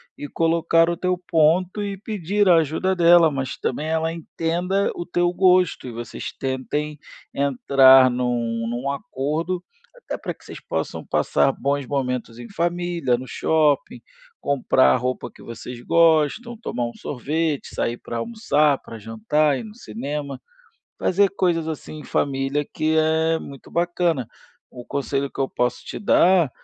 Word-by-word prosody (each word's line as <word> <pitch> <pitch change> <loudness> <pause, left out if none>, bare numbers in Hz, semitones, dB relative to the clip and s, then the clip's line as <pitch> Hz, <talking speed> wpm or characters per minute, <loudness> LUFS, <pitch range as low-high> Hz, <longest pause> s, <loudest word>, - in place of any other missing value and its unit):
e 145 - -7
colocar 165 0 +2
o 170 - 0
teu 180 +1 -1
ponto 175 +3 +2
e 200 -1 -4
pedir 205 0 -1
a 175 -2 +7
ajuda 165 +4 0
dela. 170 -2 +6
Mas 135 -2 -4
também 150 +5 -3
ela 160 0 0
entenda 170 +4 -1
o - - -4
teu 175 0 0
gosto 180 -6 +3
e - - -6
vocês 120 -1 -6
tentem 145 +3 -3 0.3
entrar 135 -1 +5
num 120 -2 -1
num 125 +4 -2
acordo 155 +6 -3 0.3
até - - -7
pra - - -5
que - - -23
vocês - - -9
possam - - -4
passar 135 - +2
bons 140 +1 -2
momentos 125 -4 -3
em 120 - -8
família, 170 -6 -1
no 130 +1 -8
shopping, 150 +2 +1 0.4
comprar 125 - +3
a - - +3
roupa 125 0 -3
que - - -16
vocês 120 +1 -8
gostam, 165 - +2
tomar 125 - -3
um 120 - -8
sorvete, 150 +3 -3
sair 120 - -1
pra 120 - -6
almoçar, 150 - +1
pra 115 - -10
jantar, 115 +7 0
ir - - -6
no 215 -1 -11
cinema. 140 - -5 0.6
Fazer 200 +2 +3
coisas 175 -4 0
assim 155 0 -6
em - - -11
família 140 +1 -1
que 155 0 +1
é 160 +1 +2
muito 140 -3 -11
bacana. 170 -6 0 0.4
O 125 - -10
conselho 140 0 -2
que - - -8
eu 135 - +1
posso 125 0 -2
te - - -7
dar 180 -6 +4
150 Hz, 155 wpm, -22 LUFS, 130-175 Hz, 0.6 s, a